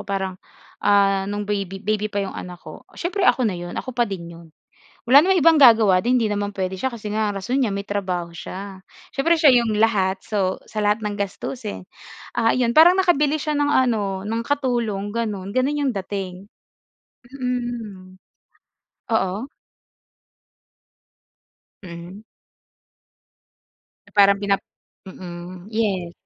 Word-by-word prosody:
Parang 190 Hz, -2 st, -4 dB, 0.4 s
ah, 195 Hz, -1 st, +3 dB
no'ng 205 Hz, 0 st, -3 dB
baby 200 Hz, -2 st, -3 dB
baby 215 Hz, 0 st, 0 dB
pa 200 Hz, -1 st, -2 dB
'yong 190 Hz, -, -6 dB
anak 180 Hz, 0 st, -7 dB
ko. -, -, -12 dB
Siyempre 360 Hz, +3 st, -3 dB
ako 255 Hz, -, +3 dB
na 215 Hz, -, +1 dB
'yon, 175 Hz, 0 st, -7 dB
ako 255 Hz, -, -4 dB
pa 240 Hz, -1 st, 0 dB
din 190 Hz, -4 st, -5 dB
'yon. 170 Hz, 0 st, -13 dB, 0.6 s
Wala 260 Hz, +4 st, +7 dB
namang 370 Hz, +4 st, +3 dB
ibang 325 Hz, -2 st, +6 dB
gagawa 220 Hz, -8 st, +7 dB
din 245 Hz, +5 st, +1 dB
hindi 225 Hz, -4 st, +1 dB
naman 205 Hz, 0 st, -3 dB
puwede 190 Hz, -1 st, -3 dB
siya 265 Hz, -, 0 dB
kasi 215 Hz, -4 st, -6 dB
nga 210 Hz, -1 st, -1 dB
rason 245 Hz, +8 st, -1 dB
niya 220 Hz, -7 st, 0 dB
may 200 Hz, -, -3 dB
trabaho 185 Hz, -4 st, -3 dB
siya. 190 Hz, +3 st, -8 dB, 0.3 s
Siyempre 335 Hz, +5 st, +2 dB
siya 285 Hz, -6 st, +6 dB
'yong 225 Hz, -2 st, -1 dB
lahat, 195 Hz, -3 st, +1 dB
so 195 Hz, -4 st, -1 dB, 0.2 s
sa 215 Hz, -, -3 dB
lahat 210 Hz, +1 st, +1 dB
ng 205 Hz, -1 st, -3 dB
gastusin. 205 Hz, +2 st, -5 dB, 0.5 s
Ah 230 Hz, -1 st, +2 dB
'yon, 235 Hz, -1 st, +1 dB
parang 350 Hz, +4 st, +7 dB
nakabili 310 Hz, -5 st, +2 dB
siya 305 Hz, 0 st, -2 dB
ng 290 Hz, 0 st, +1 dB
ano 210 Hz, -8 st, +1 dB
ng 225 Hz, +2 st, -2 dB
katulong 235 Hz, -7 st, -1 dB
gano'n. 205 Hz, -4 st, -3 dB
Gano'n 270 Hz, +3 st, +1 dB
'yong 260 Hz, -, +1 dB
dating. 195 Hz, 0 st, -5 dB, 0.8 s
Mm. 240 Hz, -8 st, -5 dB, 0.9 s
Oo. 200 Hz, +2 st, 0 dB, 2.4 s
Mm. 175 Hz, +3 st, -10 dB, 1.9 s
Parang 200 Hz, -1 st, +5 dB
pinap 200 Hz, -1 st, +2 dB, 0.5 s
mm, 180 Hz, 0 st, -9 dB
yes. 195 Hz, -6 st, -1 dB
205 Hz, 140 wpm, -22 LUFS, 190-245 Hz, 2.4 s, Wala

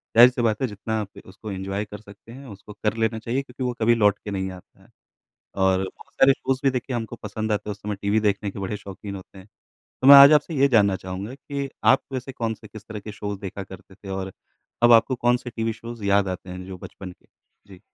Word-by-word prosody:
ज़ाहिर 120 Hz, +2 st, +10 dB
सी 125 Hz, -, -3 dB
बात 110 Hz, 0 st, +1 dB
है 130 Hz, -, +1 dB
जितना 110 Hz, +1 st, -4 dB
आप 105 Hz, -, -9 dB
उसको 100 Hz, +3 st, -9 dB
एन्जॉय 95 Hz, +2 st, -3 dB
कर 105 Hz, 0 st, -10 dB
सकते 105 Hz, +2 st, -15 dB
हैं, 135 Hz, +3 st, -11 dB
उसको 105 Hz, -1 st, -11 dB
कर 105 Hz, +1 st, -1 dB
लेना 110 Hz, 0 st, 0 dB
चाहिए 120 Hz, +4 st, -2 dB
क्योंकि 130 Hz, -1 st, -8 dB
वो 125 Hz, -1 st, -1 dB
कभी 120 Hz, +2 st, +4 dB
लौट 105 Hz, -3 st, +3 dB
के 105 Hz, -, -4 dB
नहीं 95 Hz, -1 st, -3 dB
आता 90 Hz, -1 st, -15 dB
है। -, -, -23 dB, 0.7 s
और 95 Hz, 0 st, +2 dB
बहुत 95 Hz, -, -10 dB
सारे 135 Hz, 0 st, +5 dB
शोज़ 135 Hz, -1 st, -2 dB
भी 135 Hz, -, +5 dB
देखिए 125 Hz, 0 st, -3 dB
हमको 115 Hz, 0 st, -4 dB
पसंद 110 Hz, 0 st, -4 dB
आते 105 Hz, 0 st, -2 dB
हैं, -, -, -1 dB
उस 100 Hz, -, -9 dB
समय 105 Hz, 0 st, -3 dB
टीवी 105 Hz, +2 st, +2 dB
देखने 100 Hz, -1 st, 0 dB
के -, -, -8 dB
बड़े 100 Hz, +2 st, -3 dB
शौकीन 100 Hz, 0 st, -8 dB
होते 95 Hz, +1 st, -12 dB
हैं। 95 Hz, +2 st, -13 dB, 0.6 s
तो -, -, +3 dB
मैं 140 Hz, -, +12 dB
आज 140 Hz, +2 st, +10 dB
आपसे 150 Hz, +2 st, +3 dB
ये 140 Hz, 0 st, +4 dB
जानना 105 Hz, -6 st, +4 dB
चाहूँगा 95 Hz, +6 st, -6 dB
कि 140 Hz, 0 st, -5 dB, 0.2 s
आप 130 Hz, +4 st, +5 dB
वैसे 130 Hz, +1 st, -4 dB
कौन-से, 110 Hz, -3 st, -4 dB
किस 110 Hz, 0 st, -12 dB
तरह 110 Hz, -2 st, -6 dB
के 105 Hz, -, -8 dB
शोज़ 100 Hz, -1 st, -5 dB
देखा 100 Hz, 0 st, -6 dB
करते 95 Hz, 0 st, -13 dB
थे? 100 Hz, 0 st, -13 dB
और 95 Hz, 0 st, -4 dB, 0.5 s
अब 120 Hz, 0 st, +7 dB
आपको 115 Hz, +3 st, +5 dB
कौन-से 120 Hz, +1 st, 0 dB
टीवी 115 Hz, 0 st, -2 dB
शोज़ 115 Hz, -1 st, -9 dB
याद 100 Hz, 0 st, +3 dB
आते 90 Hz, 0 st, -6 dB
हैं 90 Hz, 0 st, -7 dB
जो 95 Hz, -1 st, -8 dB
बचपन 90 Hz, +1 st, -9 dB
के? -, -, -26 dB, 0.4 s
जी। 95 Hz, -2 st, -15 dB
105 Hz, 245 wpm, -24 LUFS, 100-120 Hz, 0.7 s, मैं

